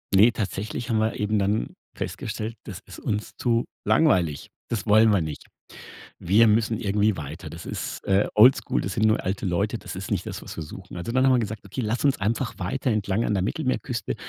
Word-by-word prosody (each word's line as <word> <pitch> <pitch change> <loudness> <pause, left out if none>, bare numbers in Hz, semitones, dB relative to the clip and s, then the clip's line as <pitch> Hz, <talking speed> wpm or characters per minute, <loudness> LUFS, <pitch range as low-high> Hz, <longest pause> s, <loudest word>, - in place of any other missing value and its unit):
Ne, 105 +5 +7
tatsächlich 110 +2 -4
haben 110 -2 +2
wir 110 +1 0
eben 105 0 +1
dann 100 +3 0 0.2
festgestellt, 110 +1 -4
das 95 -4 -7
ist - - -11
uns 105 -2 -3
zu 115 -1 +1 0.2
langweilig. 85 - +2 0.2
Das 110 -5 -2
wollen 110 +1 +6
wir 100 -3 +3
nicht. 80 -2 -6 0.7
Wir 110 +6 +5
müssen 110 +1 +2
irgendwie 105 -1 +1
weiter. 75 +1 -7
Das - - -9
ist, - - -5
äh, 100 +1 +3
oldschool, 110 0 +5
das 95 - -3
sind 110 - +1
nur 110 - +2
alte 95 +2 -2
Leute, 100 +5 0
das - - -8
ist 95 -1 -6
nicht - - -1
das, - - -6
was - - -8
wir 80 - -4
suchen. 90 +4 -10
Also 90 +7 -4
dann 130 +2 +3
haben 135 - +5
wir 125 - +4
gesagt: 110 -2 -4
„Okay, 100 +6 -4
lass 115 +4 -1
uns 140 - +3
einfach 115 +4 -1
weiter 125 +8 -1
entlang 105 0 0
an - - 0
der 95 -2 +1
Mittelmeerküste, - - -2
105 Hz, 210 wpm, -25 LUFS, 95-115 Hz, 0.7 s, Ne